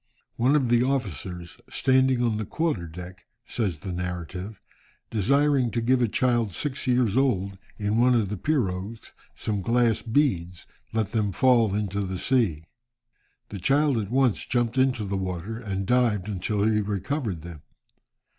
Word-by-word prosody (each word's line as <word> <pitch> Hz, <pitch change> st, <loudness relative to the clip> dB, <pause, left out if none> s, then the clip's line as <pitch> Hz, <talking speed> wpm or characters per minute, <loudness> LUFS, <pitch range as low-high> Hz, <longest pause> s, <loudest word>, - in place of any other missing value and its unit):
"One 130 Hz, +5 st, +3 dB
of 135 Hz, -5 st, +2 dB
the 120 Hz, 0 st, +4 dB
officers, 95 Hz, -, -3 dB
standing 130 Hz, -1 st, +2 dB
on 115 Hz, -3 st, +1 dB
the 110 Hz, -, -2 dB
quarter 150 Hz, -, -1 dB
deck," 90 Hz, +2 st, -10 dB, 0.2 s
says 95 Hz, -10 st, -2 dB
the 95 Hz, -, -5 dB
narrative, 90 Hz, +3 st, -5 dB, 0.5 s
"desiring 135 Hz, +4 st, +2 dB
to 115 Hz, -, -2 dB
give 125 Hz, +2 st, +2 dB
a 120 Hz, -, +3 dB
child 120 Hz, -3 st, +1 dB
six 140 Hz, +2 st, -3 dB
years 125 Hz, -4 st, +2 dB
old, 100 Hz, -8 st, +1 dB, 0.2 s
in 105 Hz, +1 st, 0 dB
one 125 Hz, +1 st, +4 dB
of 110 Hz, -5 st, +1 dB
the 105 Hz, -, -2 dB
pirogues, 105 Hz, -, -2 dB, 0.2 s
some 105 Hz, -2 st, -2 dB
glass 115 Hz, +1 st, +2 dB
beads, 95 Hz, -, 0 dB, 0.3 s
let 110 Hz, -3 st, -1 dB
them 105 Hz, -3 st, 0 dB
fall 115 Hz, -1 st, +3 dB
into 100 Hz, -1 st, -1 dB
the 95 Hz, -1 st, -3 dB
sea. 105 Hz, -, +1 dB, 0.9 s
The 100 Hz, -, -6 dB
child 140 Hz, -, +2 dB
at 100 Hz, -3 st, -4 dB
once 130 Hz, -2 st, +1 dB
jumped 120 Hz, +1 st, 0 dB
into 130 Hz, -4 st, +2 dB
the 100 Hz, 0 st, -2 dB
water 95 Hz, +4 st, -4 dB
and 100 Hz, -4 st, -3 dB
dived 115 Hz, -4 st, +2 dB
until 100 Hz, +1 st, -1 dB
he 105 Hz, 0 st, +2 dB
recovered 105 Hz, -, -3 dB
them. 85 Hz, -2 st, -10 dB
110 Hz, 155 wpm, -26 LUFS, 95-125 Hz, 0.9 s, the